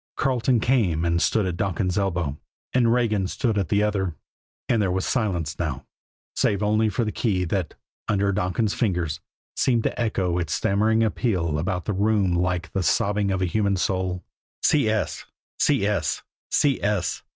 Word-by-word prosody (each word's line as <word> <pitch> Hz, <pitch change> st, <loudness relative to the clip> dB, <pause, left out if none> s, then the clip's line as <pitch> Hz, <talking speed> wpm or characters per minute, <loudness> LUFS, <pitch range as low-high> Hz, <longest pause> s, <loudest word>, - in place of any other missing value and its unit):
Carleton 130 Hz, -3 st, +2 dB
came 100 Hz, -10 st, +1 dB
and 85 Hz, 0 st, +1 dB
stood 110 Hz, 0 st, +2 dB
at 90 Hz, -2 st, -2 dB
Donkin's 90 Hz, -1 st, -1 dB
elbow, 90 Hz, -7 st, -1 dB, 0.3 s
and 120 Hz, -2 st, +3 dB
Regan 110 Hz, -6 st, +1 dB
stood 115 Hz, +3 st, -1 dB
at 95 Hz, -6 st, -1 dB
the 105 Hz, +1 st, +2 dB
other; 95 Hz, -5 st, -1 dB, 0.5 s
and 115 Hz, -3 st, +2 dB
there 95 Hz, -, +1 dB
was 95 Hz, +1 st, -1 dB
silence 90 Hz, -, -1 dB
now, -, -, -3 dB, 0.5 s
save 100 Hz, +1 st, +1 dB
only 110 Hz, +1 st, +2 dB
for 115 Hz, +3 st, -1 dB
the 105 Hz, -, -2 dB
key 100 Hz, -6 st, 0 dB
that, 90 Hz, -1 st, -2 dB, 0.3 s
under 100 Hz, -1 st, +1 dB
Donkin's 100 Hz, +2 st, 0 dB
fingers, 90 Hz, -, -1 dB, 0.4 s
seemed 120 Hz, -3 st, +2 dB
to -, -, -2 dB
echo 95 Hz, -6 st, 0 dB
its 85 Hz, -, -2 dB
stammering 110 Hz, +3 st, +2 dB
appeal 90 Hz, -, 0 dB
about 90 Hz, +2 st, -2 dB
the 105 Hz, -, -1 dB
room 100 Hz, -2 st, +2 dB
like 90 Hz, -1 st, -1 dB
the 95 Hz, -, 0 dB
sobbing 100 Hz, +3 st, +1 dB
of 95 Hz, -1 st, 0 dB
a -, -, +3 dB
human 100 Hz, +2 st, +1 dB
soul. 95 Hz, -1 st, -1 dB
100 Hz, 150 wpm, -24 LUFS, 90-110 Hz, 0.5 s, and